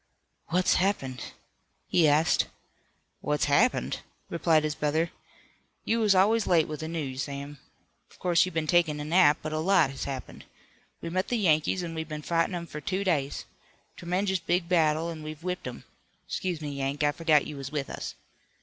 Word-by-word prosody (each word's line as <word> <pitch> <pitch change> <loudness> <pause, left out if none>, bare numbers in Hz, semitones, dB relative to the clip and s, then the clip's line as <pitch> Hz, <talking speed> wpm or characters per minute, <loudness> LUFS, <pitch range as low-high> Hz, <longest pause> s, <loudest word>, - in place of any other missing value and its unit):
"What's 180 +2 +2
happened?" 135 -10 -1 0.7
he 165 -3 +4
asked. 150 +2 +3 0.7
"What's 150 0 0
happened?" 205 - +2 0.3
replied 165 -2 +3
his 155 -1 -1
brother. 155 +3 0 0.7
"You 230 +1 +1
was 210 -3 +4
always 210 +4 +3
late 165 -3 +4
with 155 -1 -5
the 160 - -4
news, 145 -5 -3
Sam. 140 0 -6 0.5
Of - - -20
course 175 -2 +3
you've 185 -2 -4
been 160 -1 0
takin' 160 -2 +2
a 150 - -4
nap, 160 -2 +5
but 155 0 -4
a 155 - -1
lot 165 -4 +3
has 135 - -5
happened. 135 -2 -7 0.6
We 165 - -5
met 185 +2 0
the 245 - 0
Yankees 175 -2 +2
an' 165 -1 -5
we've 160 -1 -5
been 150 0 -5
fightin' 165 +2 +1
'em 170 -1 -4
for 150 -2 -8
two 190 +6 -1
days. 150 -8 -1 0.5
Tremenjous 185 +2 -1
big 175 +1 0
battle, 165 -1 +2
an' 160 -2 -8
we've 155 +1 -8
whipped 180 -4 -3
'em. 125 - -7 0.4
'Scuse 180 -4 -3
me, 150 -1 -4
Yank, 140 +1 -2
I 145 - +4
forgot 155 -2 +3
you 150 - -6
was 135 -1 -6
with 145 -2 -2
us. - - -6
160 Hz, 185 wpm, -28 LUFS, 150-180 Hz, 0.7 s, nap